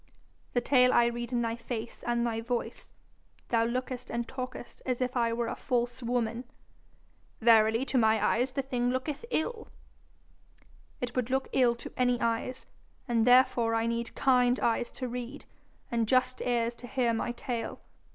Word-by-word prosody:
'The 245 Hz, -, +2 dB
tale 250 Hz, 0 st, +4 dB
I 240 Hz, -, +5 dB
read 240 Hz, 0 st, -3 dB
in 240 Hz, -1 st, +1 dB
thy 230 Hz, 0 st, -1 dB
face 230 Hz, -1 st, -6 dB
and 240 Hz, 0 st, +1 dB
thy 225 Hz, -1 st, -1 dB
voice. 240 Hz, +1 st, -4 dB, 0.6 s
Thou 230 Hz, -1 st, +3 dB
lookest 250 Hz, +1 st, -3 dB
and 235 Hz, 0 st, -2 dB
talkest 255 Hz, -2 st, -7 dB
as 250 Hz, -2 st, -1 dB
if 255 Hz, 0 st, -1 dB
I 235 Hz, -2 st, +2 dB
were 235 Hz, +1 st, -1 dB
a -, -, -3 dB
false 245 Hz, +1 st, -1 dB
woman.' 240 Hz, 0 st, -1 dB, 0.9 s
'Verily 225 Hz, +1 st, +5 dB
to 265 Hz, -, +1 dB
my 220 Hz, -1 st, +4 dB
eyes 250 Hz, +4 st, +1 dB
the 275 Hz, -, -1 dB
thing 245 Hz, -2 st, -1 dB
looketh 260 Hz, -, -2 dB
ill.' 455 Hz, +2 st, -2 dB, 1.3 s
'It 245 Hz, -1 st, -3 dB
would 250 Hz, -1 st, 0 dB
look 265 Hz, +1 st, 0 dB
ill 245 Hz, -3 st, +4 dB
to 235 Hz, -, -9 dB
any 245 Hz, -1 st, +2 dB
eyes, 230 Hz, +2 st, -2 dB, 0.4 s
and 235 Hz, -1 st, +2 dB
therefore 245 Hz, -2 st, +5 dB
I 225 Hz, 0 st, +1 dB
need 235 Hz, 0 st, -2 dB
kind 250 Hz, -2 st, +3 dB
eyes 235 Hz, +1 st, +1 dB
to 255 Hz, -, -5 dB
read, 250 Hz, +3 st, -6 dB, 0.5 s
and 230 Hz, -2 st, +1 dB
just 255 Hz, +1 st, +2 dB
ears 235 Hz, -1 st, 0 dB
to 245 Hz, -, -8 dB
hear 245 Hz, -2 st, +1 dB
my 225 Hz, +1 st, -1 dB
tale. 240 Hz, -1 st, -4 dB
240 Hz, 170 wpm, -29 LUFS, 235-255 Hz, 1.3 s, I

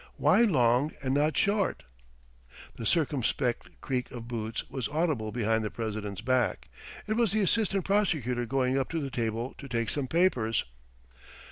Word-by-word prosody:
Why -, -, +4 dB
long 130 Hz, -, +3 dB
and 130 Hz, 0 st, 0 dB
not 150 Hz, +2 st, +2 dB
short?" 200 Hz, 0 st, +1 dB, 0.9 s
The 115 Hz, -, -3 dB
circumspect 135 Hz, -6 st, 0 dB
creak 125 Hz, -2 st, -2 dB
of 115 Hz, -2 st, -8 dB
boots 115 Hz, 0 st, -4 dB
was 130 Hz, -4 st, -3 dB
audible 150 Hz, -8 st, 0 dB
behind 110 Hz, -1 st, +1 dB
the 105 Hz, -, -2 dB
president's 105 Hz, -3 st, -4 dB
back. 120 Hz, -, 0 dB, 0.4 s
It 215 Hz, -, -1 dB
was 225 Hz, -3 st, +2 dB
the 215 Hz, -, +2 dB
assistant 195 Hz, -2 st, +1 dB
prosecutor 150 Hz, -, +1 dB
going 130 Hz, +1 st, +1 dB
up 135 Hz, -, -2 dB
to 165 Hz, -, -2 dB
the 140 Hz, -3 st, -4 dB
table 115 Hz, +1 st, -2 dB
to 140 Hz, -, -8 dB
take 115 Hz, -3 st, -1 dB
some 140 Hz, -3 st, -2 dB
papers. 130 Hz, -, +2 dB
130 Hz, 155 wpm, -29 LUFS, 115-160 Hz, 0.9 s, Why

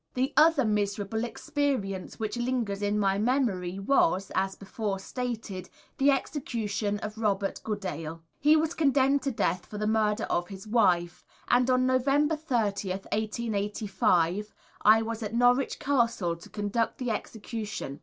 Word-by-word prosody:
The 260 Hz, +3 st, 0 dB
other 305 Hz, -3 st, +5 dB
miserable 210 Hz, +1 st, -1 dB
experience 240 Hz, -, -2 dB
which 220 Hz, 0 st, -2 dB
lingers 240 Hz, -5 st, -1 dB
in 205 Hz, 0 st, +1 dB
my 195 Hz, -1 st, +2 dB
memory 210 Hz, -7 st, 0 dB
was, 195 Hz, -3 st, +2 dB
as 190 Hz, 0 st, 0 dB
before 200 Hz, 0 st, -4 dB
stated, 215 Hz, -3 st, -5 dB, 0.3 s
the 275 Hz, +1 st, +5 dB
execution 225 Hz, -7 st, -1 dB
of 215 Hz, +1 st, -5 dB
Robert 200 Hz, -3 st, 0 dB
Goodale. 165 Hz, -6 st, -4 dB, 0.2 s
He 300 Hz, +2 st, +5 dB
was 315 Hz, +1 st, +1 dB
condemned 280 Hz, -2 st, +3 dB
to 275 Hz, -, -1 dB
death 185 Hz, -6 st, -1 dB
for 210 Hz, -, -7 dB
the 210 Hz, -, -1 dB
murder 215 Hz, 0 st, +1 dB
of 175 Hz, 0 st, -1 dB
his 195 Hz, 0 st, -9 dB
wife, 180 Hz, -6 st, +2 dB, 0.3 s
and 245 Hz, +1 st, +4 dB
on 255 Hz, 0 st, +3 dB
November 275 Hz, +4 st, +2 dB
30th, 205 Hz, -10 st, -1 dB
1885, 210 Hz, -3 st, 0 dB, 0.3 s
I 220 Hz, +1 st, +6 dB
was 225 Hz, 0 st, -4 dB
at 220 Hz, +1 st, -4 dB
Norwich 245 Hz, +2 st, +3 dB
Castle 235 Hz, -, +1 dB
to 170 Hz, -, -14 dB
conduct 210 Hz, +2 st, -1 dB
the 250 Hz, -2 st, -2 dB
execution. 210 Hz, -, -5 dB
215 Hz, 145 wpm, -28 LUFS, 195-250 Hz, 0.3 s, I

